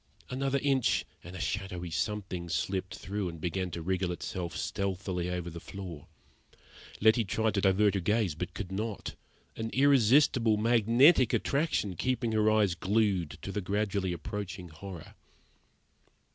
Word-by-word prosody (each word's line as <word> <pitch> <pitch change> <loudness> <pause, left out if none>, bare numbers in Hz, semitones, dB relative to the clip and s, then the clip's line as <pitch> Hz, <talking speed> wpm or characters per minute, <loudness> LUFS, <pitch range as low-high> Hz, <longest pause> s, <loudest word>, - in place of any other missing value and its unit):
Another 135 +1 0
inch, 135 -3 +2 0.2
and 90 +2 -9
a - - -6
shadowy 90 -1 -3
something 90 +2 -3
slipped 95 +3 -2
through 100 -1 -3
and 85 -1 -9
began 90 +2 -2
to 85 -1 -6
wriggle 90 0 0
itself 90 0 -4
stealthily 95 -2 -2
over 90 -1 -3
the 85 - -7
floor. 85 -3 -8 0.9
Letty 110 +2 +5
tried 110 +2 0
to 100 - +1
divert 100 +1 +4
her 100 - 0
gaze, 105 -1 +1
but 85 +4 -6
could 95 -3 -5
not 105 +2 -4 0.4
an 115 0 -3
irresistible, 130 -4 +4
magnetic 120 - +5
attraction 140 - 0
kept 120 +3 -1
her 110 0 +3
eyes 105 -4 +3
glued 95 -2 0
to 95 - -4
the 105 - -2
gradually 100 -1 -1
approaching 90 +1 -5
horror. 85 +1 -9
100 Hz, 145 wpm, -30 LUFS, 90-110 Hz, 0.9 s, Letty